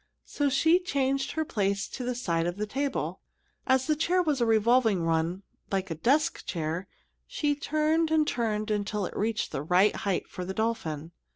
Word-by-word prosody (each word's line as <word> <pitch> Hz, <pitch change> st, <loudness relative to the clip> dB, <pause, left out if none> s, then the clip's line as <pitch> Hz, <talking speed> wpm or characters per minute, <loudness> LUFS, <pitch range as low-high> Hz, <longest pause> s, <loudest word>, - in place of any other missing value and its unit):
So 290 Hz, -1 st, 0 dB
she 320 Hz, +6 st, +4 dB
changed 275 Hz, -5 st, -1 dB
her 315 Hz, 0 st, -1 dB
place 200 Hz, -5 st, -1 dB
to 255 Hz, -, -6 dB
the 250 Hz, 0 st, -2 dB
side 170 Hz, -8 st, 0 dB
of 175 Hz, +2 st, -3 dB
the 210 Hz, -, -1 dB
table. 270 Hz, +5 st, -2 dB, 0.5 s
As 260 Hz, 0 st, +3 dB
the 305 Hz, -, +2 dB
chair 360 Hz, +4 st, +2 dB
was 295 Hz, -6 st, 0 dB
a 235 Hz, -, +3 dB
revolving 225 Hz, -4 st, +3 dB
one, 165 Hz, +3 st, 0 dB, 0.3 s
like 190 Hz, -2 st, -1 dB
a -, -, +1 dB
desk 275 Hz, -, +1 dB
chair, 165 Hz, +2 st, -3 dB, 0.4 s
she 300 Hz, -13 st, 0 dB
turned 310 Hz, +2 st, +1 dB
and 315 Hz, -1 st, +3 dB
turned 215 Hz, -2 st, -1 dB
it -, -, +3 dB
until 205 Hz, -1 st, -1 dB
it -, -, -7 dB
reached 215 Hz, 0 st, -1 dB
the -, -, -3 dB
right 180 Hz, +7 st, +3 dB
height 195 Hz, -3 st, -1 dB
for 180 Hz, -, -6 dB
the 190 Hz, +1 st, -5 dB
dolphin. 175 Hz, -9 st, -2 dB
225 Hz, 190 wpm, -28 LUFS, 190-285 Hz, 0.5 s, she